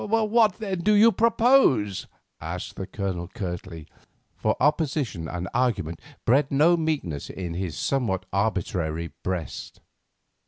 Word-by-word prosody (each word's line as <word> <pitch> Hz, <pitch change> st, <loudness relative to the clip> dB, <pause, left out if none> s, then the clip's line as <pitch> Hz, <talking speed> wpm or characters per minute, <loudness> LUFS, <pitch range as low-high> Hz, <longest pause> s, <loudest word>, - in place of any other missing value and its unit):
"What, 220 Hz, -1 st, +3 dB
then, 195 Hz, -4 st, -3 dB
do 210 Hz, +5 st, +3 dB
you 225 Hz, +3 st, +7 dB
propose?" 225 Hz, -, +3 dB, 0.3 s
asked -, -, -6 dB
the 95 Hz, -, -5 dB
Colonel 95 Hz, -3 st, -3 dB
curtly, 90 Hz, -5 st, -6 dB, 0.5 s
for -, -, 0 dB
opposition 145 Hz, -, 0 dB
and 90 Hz, +2 st, -4 dB
argument 95 Hz, -10 st, 0 dB, 0.3 s
bred 140 Hz, +4 st, +3 dB
no 155 Hz, +5 st, +4 dB
meekness 150 Hz, -, -2 dB
in 90 Hz, -3 st, -5 dB
his 85 Hz, -4 st, -4 dB
somewhat 105 Hz, -, -1 dB
arbitrary 85 Hz, -6 st, -1 dB
breast. 90 Hz, -3 st, -5 dB
110 Hz, 120 wpm, -25 LUFS, -, 0.5 s, you